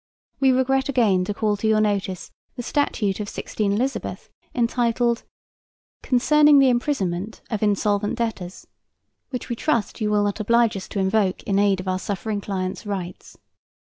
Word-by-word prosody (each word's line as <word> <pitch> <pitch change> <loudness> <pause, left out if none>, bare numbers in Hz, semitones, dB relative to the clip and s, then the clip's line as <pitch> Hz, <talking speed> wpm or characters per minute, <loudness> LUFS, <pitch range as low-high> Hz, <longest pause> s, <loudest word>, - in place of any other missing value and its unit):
We 270 -1 +4
regret 265 +1 +1
again 215 -9 +3
to 205 - -2
call 210 -1 0
to 220 - -1
your 220 0 +3
notice 200 -3 -1 0.2
the 245 - -5
Statute 220 -8 0
of 205 -1 -4
16 205 -2 -2
Eliz., 255 +6 -3 0.3
entitled, 235 -1 +1 0.8
"Concerning 295 +4 +5
the 270 -1 +6
Imprisonment 215 -6 -1
of 215 - -2
Insolvent 205 0 +1
Debtors," 200 -6 -4 0.6
which 250 - -5
we 235 - -2
trust 235 -4 -1
you 210 - +1
will 210 -1 +2
not 205 +1 -1
oblige 230 +1 +3
us 190 - -6
to 200 - -4
invoke 190 0 +1
in 195 -1 +1
aid 200 -2 +3
of 185 - -7
our 185 0 0
suffering 205 +1 -3
client's 190 -1 -4
rights. 185 -3 -6
215 Hz, 160 wpm, -23 LUFS, 200-240 Hz, 0.8 s, the